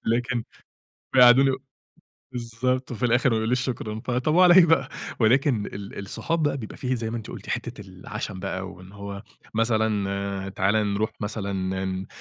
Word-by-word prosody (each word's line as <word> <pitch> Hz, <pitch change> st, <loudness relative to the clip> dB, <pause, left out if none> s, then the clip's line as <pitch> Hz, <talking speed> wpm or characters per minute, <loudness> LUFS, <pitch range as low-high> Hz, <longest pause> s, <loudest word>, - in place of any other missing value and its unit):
لكن 120 Hz, +1 st, 0 dB, 0.7 s
بيقعدوني 130 Hz, +1 st, +7 dB
و 130 Hz, 0 st, -4 dB, 0.7 s
بالضبط، 125 Hz, +2 st, -2 dB
وفي 125 Hz, 0 st, -3 dB
الآخر 120 Hz, +2 st, +3 dB
ما 115 Hz, -, +2 dB
يقوليش 115 Hz, +3 st, +1 dB
شكرًا. 115 Hz, -4 st, -3 dB
طب، 125 Hz, +6 st, 0 dB
وعلى 180 Hz, 0 st, +7 dB
إيه 180 Hz, -2 st, +8 dB
بقى. 165 Hz, 0 st, +3 dB, 0.3 s
ولكن 120 Hz, -1 st, +3 dB
ال 100 Hz, 0 st, -8 dB
الصحاب 160 Hz, +11 st, -2 dB
بقى 145 Hz, -2 st, +1 dB
بيبقى 110 Hz, -5 st, -7 dB
في، 130 Hz, -1 st, -1 dB
زي 115 Hz, -1 st, -3 dB
ما 120 Hz, -, -3 dB
أنتِ 115 Hz, -, -7 dB
قلتِ -, -, -9 dB
حتة -, -, -4 dB
العشم 95 Hz, +1 st, -7 dB
بقى 95 Hz, 0 st, -4 dB
وإن 95 Hz, +1 st, -13 dB
هو، 100 Hz, 0 st, -7 dB, 0.3 s
مثلًا 100 Hz, -3 st, 0 dB
تعالَ 95 Hz, +2 st, +1 dB, 0.2 s
نروح 110 Hz, +2 st, 0 dB
مثلًا 105 Hz, -1 st, -3 dB
ن 95 Hz, 0 st, -2 dB, 0.2 s
ن -, -, -10 dB
110 Hz, 165 wpm, -25 LUFS, 100-125 Hz, 0.7 s, إيه